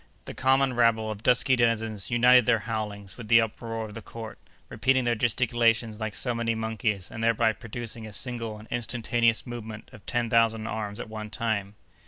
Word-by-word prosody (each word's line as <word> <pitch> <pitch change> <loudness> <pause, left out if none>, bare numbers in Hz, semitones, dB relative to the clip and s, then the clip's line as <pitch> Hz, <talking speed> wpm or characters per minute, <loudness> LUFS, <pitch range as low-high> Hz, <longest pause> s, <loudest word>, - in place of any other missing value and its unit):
The - - -7
common 135 0 +2
rabble 115 -2 +2
of 105 -1 -7
dusky 125 +2 +4
denizens 115 -4 0
united 125 0 +5
their 120 -2 +5
howlings 105 -3 -4
with 115 - -8
the 115 +1 +7
uproar 115 0 -3
of 105 - -10
the 115 - -7
court, 110 0 -9 0.3
repeating 130 -1 +1
their 120 -1 +2
gesticulations 115 -1 +1
like 110 -2 -3
so 125 - -1
many 115 -1 -1
monkeys, 110 -3 -2
and 115 0 -5
thereby 115 -1 +3
producing 115 -1 -6
a - - -9
single 115 +1 -4
and 110 +1 -13
instantaneous 120 -1 0
movement 110 -3 -8
of 110 - -13
ten 120 -1 0
thousand 115 -1 +2
arms 105 -2 -4
at - - -5
one 110 -1 -7
time. 105 -3 -2
115 Hz, 185 wpm, -27 LUFS, 110-120 Hz, 0.3 s, the